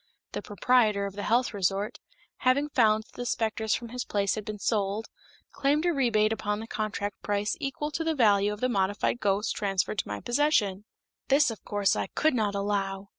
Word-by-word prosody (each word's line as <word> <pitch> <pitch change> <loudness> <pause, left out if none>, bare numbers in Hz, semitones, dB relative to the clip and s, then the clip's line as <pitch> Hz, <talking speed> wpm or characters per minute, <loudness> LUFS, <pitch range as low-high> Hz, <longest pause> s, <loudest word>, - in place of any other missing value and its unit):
The - - -4
proprietor 210 -1 +2
of 200 - -5
the 205 - -4
health 240 +3 +1
resort, 195 +1 -1 0.4
having 275 +3 +2
found 220 -5 +3
that - - -25
the 245 - -5
specters 220 -1 0
from 235 -1 -6
his 250 +1 -4
place 200 -1 0
had 215 - -4
been 210 +1 -5
sold, 205 0 -1 0.5
claimed 290 +4 +1
a 350 - +3
rebate 225 -6 +2
upon 210 -1 -2
the 220 - -6
contract 210 -2 -4
price 205 - -1
equal 295 +1 -3
to 325 - -2
the 320 -1 0
value 205 -5 +4
of 210 - -6
the 255 - +2
modified 205 +1 0
ghosts 205 +1 +1
transferred 195 0 -1
to - - -2
my 105 0 -4
possession. 240 -7 +1 0.4
This, 280 -1 +4
of 220 - -9
course, 205 -1 +1
I - - -2
could 315 -1 +3
not 210 -4 0
allow. 200 -1 -2
215 Hz, 195 wpm, -28 LUFS, 200-245 Hz, 0.5 s, value